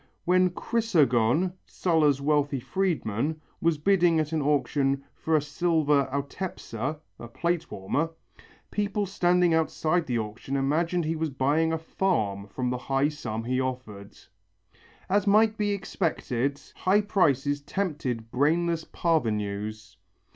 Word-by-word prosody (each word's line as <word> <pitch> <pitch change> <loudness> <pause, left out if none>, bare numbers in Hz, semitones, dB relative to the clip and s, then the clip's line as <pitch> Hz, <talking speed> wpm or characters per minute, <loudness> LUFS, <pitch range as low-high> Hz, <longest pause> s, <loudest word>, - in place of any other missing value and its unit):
When 185 +1 +4
Chrysogon, 175 - +2
Sulla's 155 -6 +2
wealthy 145 -1 +1
freedman, 155 - -1 0.2
was 165 -2 +2
bidding 175 0 +3
at 155 0 -1
an 160 -1 0
auction 140 -1 +1
for 160 - -1
a 155 - +4
silver 150 -2 +2
autepsa 140 - -4 0.2
(a 120 - -8
plate 170 +7 -2
warmer), 140 +12 -1 0.6
people 205 0 -1
standing 180 -2 +2
outside 160 +1 +1
the 120 -2 0
auction 110 +5 -4
room 135 0 +1
imagined 165 +4 +1
he 160 +1 -1
was 160 0 -1
buying 145 +5 +1
a 160 - 0
farm 110 - -1
from 125 +4 -2
the 125 - -2
high 135 +3 +1
sum 115 -7 -5
he 130 +2 0
offered. 125 -6 -6 0.9
As 205 +1 +1
might 215 +2 +5
be 210 -1 0
expected, 150 -9 -1 0.2
high 195 +3 +3
prices 145 -8 +1
tempted 140 - -3
brainless 165 +4 +1
parvenus. 105 - -2
150 Hz, 130 wpm, -27 LUFS, 130-175 Hz, 0.9 s, might